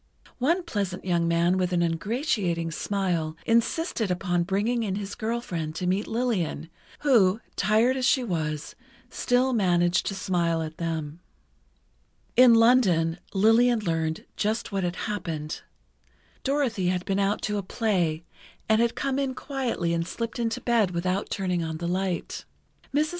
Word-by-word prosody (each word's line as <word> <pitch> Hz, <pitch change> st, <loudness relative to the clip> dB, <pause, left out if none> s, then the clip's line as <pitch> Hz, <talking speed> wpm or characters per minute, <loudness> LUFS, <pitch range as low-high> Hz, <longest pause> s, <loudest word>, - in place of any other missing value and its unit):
One 335 Hz, +8 st, +2 dB
pleasant 200 Hz, -, -3 dB
young 170 Hz, -2 st, +1 dB
man 170 Hz, +2 st, +2 dB
with 180 Hz, -1 st, 0 dB
an 175 Hz, -1 st, +2 dB
ingratiating 170 Hz, -, -1 dB
smile, 170 Hz, -4 st, -1 dB
insisted 230 Hz, -, +1 dB
upon 180 Hz, -1 st, 0 dB
bringing 205 Hz, +7 st, 0 dB
in 200 Hz, -4 st, -1 dB
his 200 Hz, 0 st, -5 dB
girl 230 Hz, +2 st, -2 dB
friend 160 Hz, -8 st, -4 dB
to 180 Hz, -, -3 dB
meet 190 Hz, +4 st, 0 dB
Lillian, 200 Hz, -9 st, -1 dB, 0.3 s
who, 225 Hz, -8 st, +4 dB, 0.2 s
tired 220 Hz, +6 st, +3 dB
as 260 Hz, -1 st, -1 dB
she 260 Hz, -, +3 dB
was, 155 Hz, -7 st, -3 dB, 0.4 s
still 255 Hz, +1 st, +1 dB
managed 175 Hz, -5 st, +2 dB
to 195 Hz, -, -2 dB
smile 170 Hz, -3 st, 0 dB
at 155 Hz, 0 st, -7 dB
them. 160 Hz, -2 st, -3 dB, 1.2 s
In 250 Hz, -2 st, +8 dB
London, 190 Hz, -9 st, +4 dB, 0.2 s
Lillian 225 Hz, +4 st, +4 dB
learned 160 Hz, -4 st, -2 dB
just 215 Hz, +2 st, -1 dB
what 195 Hz, -1 st, -1 dB
had 175 Hz, 0 st, -1 dB
happened: 165 Hz, -7 st, -4 dB, 0.8 s
Dorothy 265 Hz, -9 st, 0 dB
had 180 Hz, 0 st, 0 dB
been 195 Hz, 0 st, 0 dB
out 200 Hz, +1 st, 0 dB
to 210 Hz, -1 st, -1 dB
a -, -, -2 dB
play, 180 Hz, -6 st, 0 dB, 0.4 s
and 220 Hz, +1 st, +4 dB
had 235 Hz, 0 st, +1 dB
come 275 Hz, 0 st, -1 dB
in 270 Hz, -2 st, -1 dB
quietly 250 Hz, -12 st, -2 dB
and 165 Hz, 0 st, -1 dB
slipped 230 Hz, +3 st, -4 dB
into 230 Hz, +1 st, -1 dB
bed 230 Hz, -5 st, +2 dB
without 180 Hz, +3 st, -1 dB
turning 180 Hz, -3 st, -1 dB
on 160 Hz, -1 st, -4 dB
the 170 Hz, +1 st, -4 dB
light. 185 Hz, 0 st, -2 dB, 0.5 s
Mrs. 300 Hz, +2 st, +1 dB
195 Hz, 155 wpm, -26 LUFS, 170-230 Hz, 1.2 s, In